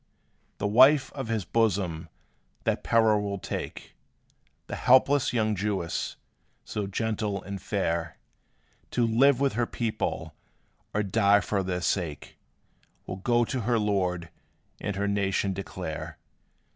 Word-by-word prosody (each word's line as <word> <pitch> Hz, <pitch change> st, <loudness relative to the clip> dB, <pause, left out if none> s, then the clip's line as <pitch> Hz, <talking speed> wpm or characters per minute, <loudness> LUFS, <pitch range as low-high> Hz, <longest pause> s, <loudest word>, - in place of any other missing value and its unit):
The -, -, -3 dB
wife 130 Hz, +7 st, +5 dB
of 135 Hz, -4 st, -5 dB
his 110 Hz, -4 st, -1 dB
bosom 95 Hz, -8 st, 0 dB, 0.5 s
that -, -, 0 dB
peril 110 Hz, -2 st, +3 dB
will 100 Hz, -1 st, -3 dB
take! -, -, -6 dB, 0.7 s
The -, -, -5 dB
helpless 130 Hz, +2 st, +4 dB
young 110 Hz, -3 st, +1 dB
Jewess, 95 Hz, -4 st, -2 dB, 0.5 s
so 105 Hz, -2 st, -3 dB
gentle 105 Hz, -1 st, -2 dB
and 100 Hz, 0 st, -6 dB
fair, 85 Hz, -5 st, -2 dB, 0.7 s
To 120 Hz, -, +1 dB
live 125 Hz, +4 st, +4 dB
with 140 Hz, -1 st, +2 dB
her 120 Hz, +2 st, 0 dB
people, 115 Hz, -2 st, -3 dB, 0.6 s
or 105 Hz, -, 0 dB
die 100 Hz, 0 st, +4 dB
for 100 Hz, +1 st, -1 dB
their 90 Hz, -1 st, -2 dB
sake, 85 Hz, -6 st, -2 dB, 0.7 s
Will 95 Hz, -, -5 dB
go 120 Hz, +4 st, +2 dB
to 130 Hz, -, -3 dB
her 120 Hz, +2 st, +1 dB
lord, 90 Hz, -5 st, 0 dB, 0.5 s
and 105 Hz, -1 st, -3 dB
her 100 Hz, +1 st, -1 dB
nation 100 Hz, -1 st, 0 dB
declare. 90 Hz, -4 st, -6 dB
105 Hz, 130 wpm, -27 LUFS, 95-115 Hz, 0.7 s, wife